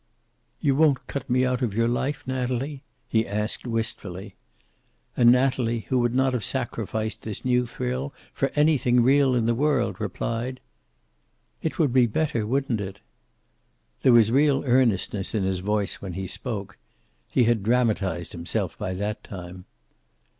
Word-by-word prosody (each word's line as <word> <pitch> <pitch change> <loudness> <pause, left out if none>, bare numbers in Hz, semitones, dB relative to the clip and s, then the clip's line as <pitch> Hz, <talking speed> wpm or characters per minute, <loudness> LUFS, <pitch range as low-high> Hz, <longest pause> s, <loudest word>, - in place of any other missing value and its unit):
"You 140 -2 +2
won't 145 -3 +3
cut 140 - -5
me 125 +1 +3
out 125 0 0
of 115 -5 -1
your 115 +1 +2
life, 130 +4 -1
Natalie?" 130 +2 -2 0.3
he 115 -2 +1
asked 105 +4 -3
wistfully. 105 -4 -4 0.8
And 120 -1 +6
Natalie, 125 -2 +2
who 130 - +2
would 120 0 +1
not 130 0 +2
have 120 -4 -1
sacrificed 110 -3 -2
this 110 +1 -6
new 125 -1 +2
thrill 125 +3 -3 0.2
for 135 - 0
anything 140 -5 +4
real 135 0 +4
in 120 -2 +1
the 115 - +2
world, 120 -6 0
replied: 115 +5 -3 1.0
"It 160 - -3
would 150 -7 +2
be 125 -2 +5
better, 115 -3 -1
wouldn't 130 -3 0
it?" 95 -1 -6 1.0
There 130 - +5
was 115 -2 +6
real 140 +1 +3
earnestness 115 -6 +1
in 105 - +1
his 95 -1 0
voice 105 +1 -1
when 95 -3 -6
he 95 +2 -4
spoke. 105 0 -5 0.5
He 125 - +3
had 115 -2 +2
dramatized 105 -6 0
himself 85 0 -3
by 95 - -3
that 105 +3 -3
time. 90 -1 -9
120 Hz, 155 wpm, -25 LUFS, 105-130 Hz, 1.0 s, And